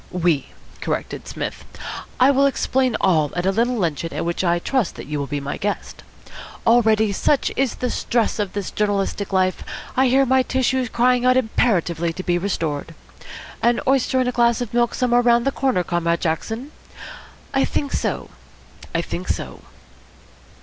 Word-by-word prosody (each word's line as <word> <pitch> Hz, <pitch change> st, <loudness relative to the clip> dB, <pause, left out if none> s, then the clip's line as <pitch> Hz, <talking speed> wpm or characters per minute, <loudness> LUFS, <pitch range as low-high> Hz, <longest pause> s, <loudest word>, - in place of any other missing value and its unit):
"We," 175 Hz, -5 st, +1 dB, 0.3 s
corrected -, -, -4 dB
Psmith. -, -, -5 dB, 0.6 s
"I 260 Hz, +2 st, +6 dB
will 275 Hz, 0 st, +4 dB
explain 260 Hz, -2 st, +1 dB
all 155 Hz, -6 st, +2 dB
at 175 Hz, 0 st, -1 dB
a 190 Hz, -, +3 dB
little 235 Hz, +4 st, +1 dB
luncheon 165 Hz, -4 st, -1 dB
at -, -, -2 dB
which 170 Hz, +2 st, -1 dB
I 175 Hz, -1 st, +2 dB
trust 235 Hz, -, -1 dB
that -, -, -8 dB
you 150 Hz, 0 st, -3 dB
will 140 Hz, -, -3 dB
be 145 Hz, 0 st, -2 dB
my 140 Hz, 0 st, -4 dB
guest. 205 Hz, 0 st, -4 dB, 0.6 s
Already, 220 Hz, -2 st, +4 dB
such 280 Hz, +8 st, +1 dB
is 265 Hz, -3 st, 0 dB
the 250 Hz, -, -2 dB
stress 230 Hz, -2 st, 0 dB
of 205 Hz, -3 st, -2 dB
this 200 Hz, -1 st, -4 dB
journalistic 205 Hz, -1 st, -1 dB
life, 185 Hz, -1 st, +1 dB, 0.3 s
I 265 Hz, +1 st, +4 dB
hear 270 Hz, +2 st, +4 dB
my 260 Hz, +1 st, +4 dB
tissues 260 Hz, -1 st, 0 dB
crying 245 Hz, +1 st, +2 dB
out 255 Hz, 0 st, +4 dB
imperatively 175 Hz, -9 st, +1 dB
to 185 Hz, -, -6 dB
be 175 Hz, -1 st, +1 dB
restored. 165 Hz, -5 st, -3 dB, 0.7 s
An 235 Hz, 0 st, +3 dB
oyster 265 Hz, -1 st, +2 dB
and 255 Hz, -, +1 dB
a -, -, +1 dB
glass 235 Hz, -2 st, +2 dB
of 245 Hz, -2 st, -4 dB
milk 240 Hz, 0 st, +2 dB
somewhere 245 Hz, -1 st, +3 dB
round 240 Hz, -1 st, +3 dB
the 275 Hz, -, +2 dB
corner, 260 Hz, -10 st, 0 dB
Comrade 170 Hz, -1 st, 0 dB
Jackson? 225 Hz, -, -2 dB, 0.8 s
I -, -, +3 dB
think 285 Hz, -1 st, -2 dB
so, -, -, -2 dB, 0.6 s
I 165 Hz, -, +1 dB
think 180 Hz, +2 st, -5 dB
so." -, -, -4 dB
220 Hz, 170 wpm, -21 LUFS, 175-250 Hz, 0.8 s, I